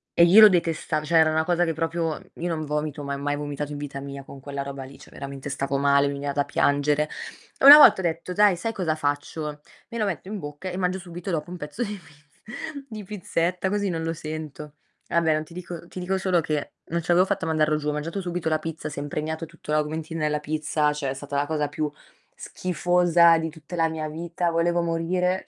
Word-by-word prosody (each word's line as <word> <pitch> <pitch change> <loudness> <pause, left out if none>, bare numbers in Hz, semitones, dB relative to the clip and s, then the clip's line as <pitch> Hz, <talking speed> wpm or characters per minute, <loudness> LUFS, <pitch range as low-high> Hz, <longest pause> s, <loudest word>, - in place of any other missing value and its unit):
E 170 - +6
io 190 +6 +8
lo 215 - +12
detestavo, 165 -3 0
cioè 165 +2 +3
era 160 -1 +6
una 160 0 +2
cosa 175 +1 +2
che 165 - -1
proprio 165 0 -2
io 170 - -4
non 155 -2 -2
vomito, 150 0 -3
ma 140 0 -3
mai 145 +1 -1
vomitato 145 0 -4
in 145 - -5
vita 140 -1 -6
mia 140 0 -7
con 135 0 -11
quella 140 +1 -5
roba 140 -1 -6
lì, 135 +1 -12
cioè - - -15
veramente 140 0 -7
stavo 140 0 -1
male, 140 0 +4
mi 140 - -2
veniva 140 0 -3
da 145 0 0
piangere. 145 +1 +1 0.5
E - - +1
una 285 +2 +13
volta 295 - +8
ho - - -7
detto: 170 +2 -2
"Dai, 205 0 +5
sai 225 +6 -3
cosa 170 -6 -1
faccio? 150 0 -3 0.3
Me 235 - -6
lo 215 - +1
metto 185 -4 -4
in 210 -1 -4
bocca 145 +4 -6
e 180 - -5
mangio 185 0 0
subito 175 0 -8
dopo 165 +1 -2
un 180 - -6
pezzo 170 +9 -4
di 210 -2 -4
pizz 150 -4 -20 0.6
di 215 -2 -7
pizzetta, 180 -2 -1
così 205 0 0
non 165 -2 -2
lo 165 0 -1
sento". 155 -2 -7 0.3
Vabbè, 165 -2 +2
non 155 0 -1
ti 165 - -15
dico 170 -1 -7
ti 185 - -8
dico 185 +2 -1
solo 185 -2 +2
che 150 -2 -3
non 170 +1 -2
ce 165 - -12
l'avevo 180 +2 +5
fatta 200 -1 -1
a - - -3
mandarlo 155 -1 +2
giù, 150 0 -2
ho - - +1
mangiato 165 +6 -3
subito 175 -2 -3
la 155 -1 +1
pizza, 160 -1 -5
si 145 - -6
è - - -3
impregnato 155 +3 -3
tutto 150 - -10
l'Augmentin 155 +2 -1
nella 150 -1 0
pizza, 150 0 0
cioè 145 -2 -3
è - - -1
stata 140 +1 -7
la 140 +1 +1
cosa 150 -1 -1
più 150 0 -3 0.4
schifosa 175 - +3
di 160 0 -2
tutta 160 +2 -10
la 165 -1 +2
mia 160 -1 -4
vita, 170 +2 -2
volevo 170 +1 +1
morire. 180 +2 0
160 Hz, 235 wpm, -25 LUFS, 150-175 Hz, 0.6 s, una